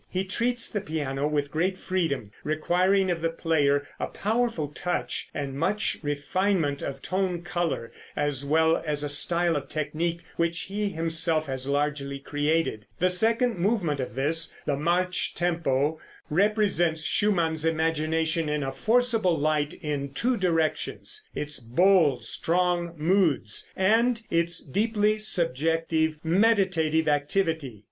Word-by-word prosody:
He 185 +1 -1
treats 235 +5 -1
the 205 - -3
piano 145 -6 -2
with 145 -1 -1
great 185 +4 0
freedom, 160 - -2
requiring 180 +5 +2
of 170 -2 -2
the 165 - +1
player 145 -4 +1
a - - -1
powerful 225 -7 -1
touch 175 +4 -3
and 140 -2 -4
much 165 +9 -1
refinement 145 +1 0
of 135 -1 -5
tone 185 -2 -1
color, 175 -9 -2 0.2
as 145 -2 -1
well 160 +3 +3
as 150 -2 -2
a 145 - -1
style 170 +3 +2
of 140 -2 -4
technique 160 +3 -2 0.2
which 170 0 0
he 205 +1 -2
himself 165 -2 +1
has 130 -1 -4
largely 140 -1 -1
created. 145 -5 -1
The 185 +1 +2
second 225 +3 +1
movement 175 -7 +1
of 125 -3 -4
this, 155 +5 0
the 145 - +1
march 180 +5 0
tempo, 160 -4 0 0.3
represents 185 -4 +2
Schumann's 165 -7 +1
imagination 160 0 0
in 150 -1 -1
a 135 - -2
forcible 225 - +2
light 150 +2 0
in 140 -2 -3
two 250 - +1
directions 180 - -1
its 150 0 -4
bold, 140 0 +3
strong 175 +4 0
moods, 160 - +1
and 225 +5 +3
its 170 0 +1
deeply 215 - +1
subjective, 165 -3 0
meditative 170 -4 +2
activity. 145 - 0
165 Hz, 130 wpm, -26 LUFS, 145-185 Hz, 0.3 s, well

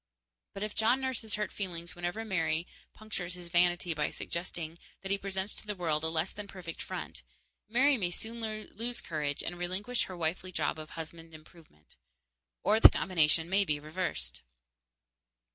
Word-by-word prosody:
But 200 - -3
if 210 0 -3
John 235 +4 +4
nurses 255 -5 -1
hurt 210 -1 -1
feelings 170 -4 -3
whenever 175 +6 -2
Mary 165 -4 +1 0.3
punctures 180 -5 -4
his 175 -1 -8
vanity 175 0 +3
by 150 -1 0
suggesting 170 -1 -4 0.2
that 195 - -3
he 200 - +4
presents 195 0 -2
to - - -7
the 210 - -1
world 160 -4 0
a - - +2
less 160 +2 +1
than 205 0 -6
perfect 180 -4 -7
front, - - -5 0.5
Mary 265 +5 +5
may 185 -5 +1
soon 225 +6 -6 0.3
lose 240 +2 -2
courage 150 -3 -2
and 175 0 -4
relinquish 195 +8 0
her 185 - -7
wifely 170 +3 -1
job 155 -2 0
of 155 0 -7
husband 165 0 -8
improvement. 155 - -17 0.7
Or 210 +3 +5
the - - +13
combination 165 -2 +3
may 195 +3 +4
be 150 -6 0
reversed. 150 - -3
175 Hz, 165 wpm, -32 LUFS, 160-205 Hz, 0.7 s, the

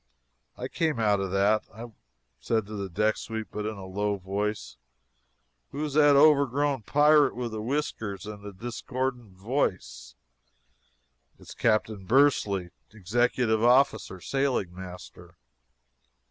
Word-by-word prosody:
I - - -4
came 155 -7 -1
out 105 -2 +2
of 95 -1 -2
that. 100 +3 +2
I 115 +2 -10 0.5
said 110 - -1
to 105 -1 -6
a 95 - -6
deck 105 +5 +1
sweep 110 -1 -6
but 105 0 -4
in 110 -1 -5
a 95 - -8
low 100 +2 -2
voice: 100 - -4 0.9
"Who 150 +2 -4
is 145 - -5
that 145 -1 +5
overgrown 140 -2 +3
pirate 145 +3 +4
with 120 -1 -4
the 110 -1 -5
whiskers 110 -7 -3
and 105 -1 -9
the 105 - -7
discordant 120 0 -5
voice?" 95 - -3 1.2
"It's - - -12
Captain 110 -3 0
Bursley 105 -8 +2 0.2
executive 110 +2 0
officer 120 -6 +3
sailing 130 -6 -1
master." 90 0 -11
110 Hz, 130 wpm, -27 LUFS, 100-130 Hz, 1.2 s, that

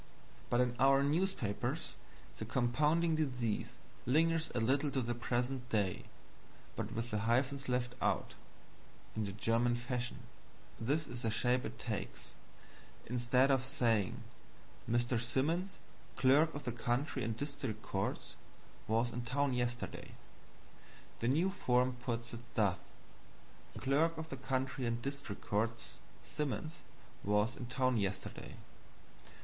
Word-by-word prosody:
But 120 - +4
in 125 -1 +1
our 135 +1 +6
newspapers 145 - 0 0.5
the - - -2
compounding 150 +7 +2
disease 125 -8 -1 0.3
lingers 165 +4 +3
a - - +2
little 135 +6 +2
to 135 - 0
the 120 +1 -1
present 125 +1 -1
day, 100 -5 +1 0.7
but - - -3
with 115 +1 -3
the 105 - +1
hyphens 130 +5 +1
left 125 0 0
out, - - +1 0.8
in 110 -1 0
the 100 - -3
German 115 +4 +2
fashion. 125 0 -3 0.6
This 145 +7 0
is 120 - -6
the 115 - +1
shape 125 +3 +2
it - - -6
takes: - - -4 0.8
instead 125 +3 +3
of 135 -2 +3
saying 120 -7 +1 0.7
"Mr. 120 +1 +2
Simmons, 160 +10 0 0.4
clerk 140 +7 +5
of 145 - -4
the 125 - -1
county 120 +4 -1
and 115 -1 -2
district 140 -6 -3
courts, 95 +1 -2 0.5
was 115 +2 +2
in 120 - -3
town 130 +3 +1
yesterday," 120 0 -2 1.0
the 115 - 0
new 165 +9 +3
form 125 -8 +2
puts 120 -1 -4
it 115 - -5 0.2
thus: 100 -4 +3 1.0
"Clerk 155 +5 +2
of 160 0 -5
the 135 - -5
County 130 -1 -1
and 115 0 0
District 140 -7 -4
Courts 110 +3 -1 0.2
Simmons 155 +3 -3 0.4
was 105 +3 +2
in 120 - -6
town 130 -1 +2
yesterday." 95 -2 -3
125 Hz, 130 wpm, -35 LUFS, 115-140 Hz, 1.0 s, our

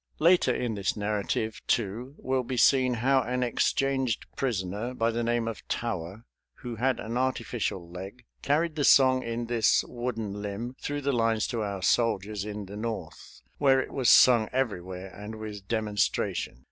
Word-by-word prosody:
Later 170 -4 +4
in 120 -2 -1
this 100 -1 -1
narrative, 105 +1 -2
too, 120 +4 -1
will 130 0 -1
be 125 +1 -4
seen 130 0 +4
how 130 +3 +3
an 125 0 -1
exchanged 130 0 0
prisoner, 110 0 -2
by 115 -1 +1
the 115 +1 -2
name 120 0 0
of 115 - -4
Tower, 105 -1 -4 0.3
who 120 -2 -7
had 130 +2 +1
an 115 +3 -4
artificial 120 -8 -2
leg, 95 +7 -9 0.2
carried 155 +3 +1
the 150 - -1
song 130 -2 +6
in 115 0 -3
this 115 -2 +3
wooden 115 -4 -4
limb 105 +5 -5
through 145 0 -3
the 140 0 0
lines 115 -2 +1
to 115 - -2
our 100 -3 -3
soldiers 105 -3 +1
in 105 -1 -5
the 100 +2 -9
North, 115 +1 -6 0.2
where 135 -2 +5
it - - -3
was 130 -5 +2
sung 115 -1 +6
everywhere 95 -7 -3
and 105 +2 -8
with 105 -3 -8
demonstration. 105 - -1
115 Hz, 165 wpm, -28 LUFS, 105-125 Hz, 0.3 s, song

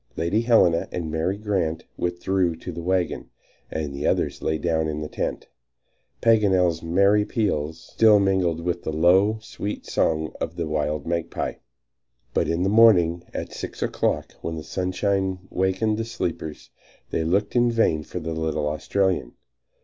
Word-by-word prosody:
Lady 85 +7 +1
Helena 110 -8 +4
and 80 -3 -4
Mary 80 +5 -1
Grant 95 -7 -1
withdrew 90 0 0
to - - -7
the 85 - -6
wagon, 90 0 -1 0.4
and 75 -3 -3
the 70 - -2
others - - 0
lay 80 - 0
down 80 0 0
in 75 0 -3
the 75 - -4
tent, - - -4 0.7
Paganel's 95 -7 +3
merry 100 +5 +3
peals 80 -9 -1
still 110 -2 +6
mingling 95 -4 +1
with 85 0 -1
the - - -3
low, 95 +7 +4
sweet 105 -1 -6
song 80 0 0
of - - -3
the 85 - -2
wild 75 -1 -1
magpie. 85 0 -2 0.8
But - - +1
in 85 +2 0
the - - +2
morning 90 -6 +5
at - - -5
six - - -5
o'clock, - - -1
when 80 - -4
the 80 - -6
sunshine 95 +2 -1
wakened 95 +4 0
the 115 - -1
sleepers, 80 - -5 0.4
they - - 0
looked 100 +7 0
in 120 0 +4
vain 110 -9 +2
for 90 - -6
the 80 0 -4
little 80 -2 -1
Australian. 80 -3 0
85 Hz, 155 wpm, -24 LUFS, 80-100 Hz, 0.8 s, still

